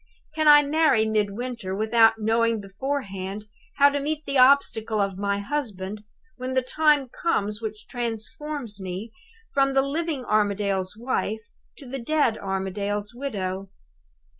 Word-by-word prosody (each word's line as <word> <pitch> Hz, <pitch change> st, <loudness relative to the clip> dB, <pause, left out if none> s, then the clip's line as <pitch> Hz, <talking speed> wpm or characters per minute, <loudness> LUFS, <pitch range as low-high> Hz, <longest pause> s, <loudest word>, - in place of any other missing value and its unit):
Can 310 Hz, 0 st, +1 dB
I 295 Hz, 0 st, +9 dB
marry 290 Hz, -6 st, +3 dB
Midwinter, 215 Hz, -1 st, -2 dB
without 225 Hz, +2 st, +4 dB
knowing 225 Hz, +1 st, +1 dB
beforehand 200 Hz, -2 st, -4 dB, 0.3 s
how 285 Hz, 0 st, +6 dB
to 285 Hz, 0 st, -1 dB
meet 305 Hz, +2 st, -2 dB
the 280 Hz, -, -4 dB
obstacle 245 Hz, -5 st, +4 dB
of 195 Hz, -2 st, -1 dB
my 200 Hz, 0 st, 0 dB
husband, 210 Hz, -4 st, -4 dB, 0.3 s
when 255 Hz, 0 st, -4 dB
the 260 Hz, 0 st, +2 dB
time 295 Hz, 0 st, +3 dB
comes 210 Hz, -, -1 dB
which 215 Hz, -1 st, -6 dB
transforms 240 Hz, 0 st, -4 dB
me 190 Hz, +4 st, -5 dB, 0.4 s
from 275 Hz, -1 st, +2 dB
the 270 Hz, -, +4 dB
living 295 Hz, -1 st, -2 dB
Armadale's 200 Hz, -2 st, 0 dB
wife 225 Hz, -2 st, -3 dB, 0.3 s
to 280 Hz, -, -11 dB
the 265 Hz, +2 st, -5 dB
dead 270 Hz, -2 st, +1 dB
Armadale's 200 Hz, +2 st, -3 dB
widow? 195 Hz, -7 st, -4 dB
225 Hz, 135 wpm, -25 LUFS, 200-275 Hz, 0.4 s, I